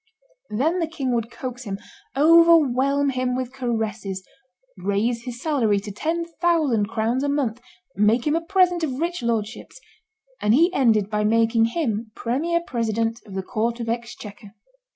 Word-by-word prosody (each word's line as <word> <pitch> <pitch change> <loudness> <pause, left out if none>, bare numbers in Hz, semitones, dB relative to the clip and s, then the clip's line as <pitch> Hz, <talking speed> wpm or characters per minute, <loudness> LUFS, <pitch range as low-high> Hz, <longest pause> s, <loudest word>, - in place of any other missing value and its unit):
'" - - -38
Then 300 +12 0
the 330 - 0
king 275 -6 -3
would 230 -1 -1
coax 250 +2 -7
him, 195 -2 -4 0.4
overwhelm 285 -4 +5
him 255 -1 -1
with 255 0 -4
caresses, 220 -6 -3 0.5
raise 225 +4 -1
his 245 -1 -6
salary 245 -9 +1
to 205 +1 -7
ten 325 - -2 0.2
thousand 305 - +2
crowns 230 +3 -1
a 285 - 0
month, 255 -5 -1 0.3
make 215 +4 +2
him 300 +1 +2
a 330 - +1
present 355 -1 +2
of 270 -4 -2
rich 345 -1 -2
lordships; 230 - -3 0.6
and 210 +2 +3
he 340 +6 +4
ended 225 - +3
by 210 0 0
making 225 +1 +3
him 230 -5 -2
premier 325 +9 -1
president 230 -2 -1
of 195 - -9
the 190 - -2
Court 230 +3 -2
of 230 -1 -4
Exchequer. 220 -3 -6
240 Hz, 160 wpm, -23 LUFS, 220-295 Hz, 0.6 s, overwhelm